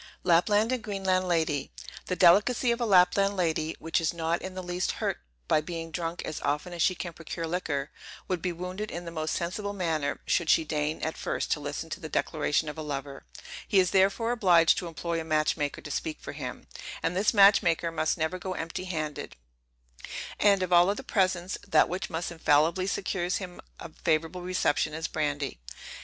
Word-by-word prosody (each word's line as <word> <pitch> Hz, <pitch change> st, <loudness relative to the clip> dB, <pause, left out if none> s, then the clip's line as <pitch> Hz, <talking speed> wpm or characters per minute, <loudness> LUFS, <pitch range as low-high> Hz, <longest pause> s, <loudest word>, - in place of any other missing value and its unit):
LAPLAND 205 Hz, +6 st, +3 dB
AND 255 Hz, -2 st, -1 dB
GREENLAND 190 Hz, -3 st, 0 dB
LADY. 160 Hz, -5 st, 0 dB, 0.4 s
The 180 Hz, -, -1 dB
delicacy 205 Hz, +8 st, +5 dB
of 235 Hz, +1 st, -1 dB
a 235 Hz, -, +1 dB
Lapland 195 Hz, +1 st, +4 dB
lady, 160 Hz, -2 st, 0 dB
which 165 Hz, +1 st, -1 dB
is 165 Hz, +1 st, 0 dB
not 165 Hz, +1 st, -1 dB
in 185 Hz, 0 st, -7 dB
the 185 Hz, -, -5 dB
least 180 Hz, +1 st, -1 dB
hurt -, -, -2 dB, 0.3 s
by 155 Hz, -, +3 dB
being 165 Hz, 0 st, -6 dB
drunk 170 Hz, 0 st, -3 dB
as 155 Hz, -, -5 dB
often 150 Hz, +5 st, -1 dB
as 170 Hz, -, -4 dB
she 185 Hz, -, +3 dB
can 175 Hz, -1 st, -5 dB
procure 165 Hz, +1 st, -5 dB
liquor, 160 Hz, -5 st, -2 dB, 0.4 s
would 180 Hz, -3 st, -1 dB
be 180 Hz, -, -1 dB
wounded 180 Hz, +5 st, -5 dB
in 175 Hz, +1 st, -6 dB
the 170 Hz, -, -6 dB
most 155 Hz, -1 st, -2 dB
sensible 200 Hz, +4 st, -3 dB
manner, 160 Hz, -7 st, -1 dB
should 170 Hz, -2 st, +1 dB
she -, -, +5 dB
deign 150 Hz, 0 st, -2 dB
at 160 Hz, -, -2 dB
first -, -, -3 dB
to -, -, +1 dB
listen 145 Hz, +2 st, -5 dB
to -, -, -4 dB
the 160 Hz, -4 st, -7 dB
declaration 155 Hz, 0 st, 0 dB
of 150 Hz, +1 st, -5 dB
a -, -, -3 dB
lover; 140 Hz, -2 st, -5 dB, 0.4 s
he 195 Hz, -, +4 dB
is 180 Hz, -1 st, +3 dB
therefore 200 Hz, +5 st, +3 dB
obliged 180 Hz, -8 st, +5 dB
to 180 Hz, -, -5 dB
employ 165 Hz, 0 st, -3 dB
a -, -, -5 dB
match 155 Hz, -1 st, +1 dB
maker 145 Hz, -2 st, -3 dB
to 150 Hz, -, -8 dB
speak 155 Hz, +2 st, -3 dB
for -, -, -7 dB
him; -, -, -7 dB, 0.4 s
and 165 Hz, +2 st, 0 dB
this 200 Hz, +3 st, +3 dB
match 200 Hz, -2 st, +7 dB
maker 170 Hz, -2 st, 0 dB
must 155 Hz, 0 st, 0 dB
never 160 Hz, +3 st, -1 dB
go 185 Hz, 0 st, -4 dB
empty 165 Hz, +3 st, -4 dB
handed; 155 Hz, -5 st, -4 dB, 1.0 s
and 200 Hz, -2 st, +4 dB
of 180 Hz, -1 st, -1 dB
all 175 Hz, +2 st, +6 dB
other 205 Hz, -, -2 dB
presents, 185 Hz, -2 st, 0 dB
that -, -, +5 dB
which 180 Hz, +2 st, -4 dB
must 165 Hz, +1 st, -3 dB
infallibly 165 Hz, +3 st, +2 dB
secures 185 Hz, -2 st, -1 dB
him 180 Hz, -3 st, -8 dB, 0.2 s
a 165 Hz, -, -8 dB
favorable 165 Hz, +3 st, 0 dB
reception 175 Hz, -4 st, 0 dB
is 160 Hz, +1 st, -3 dB
brandy. 145 Hz, -, -2 dB
170 Hz, 200 wpm, -28 LUFS, 160-185 Hz, 1.0 s, match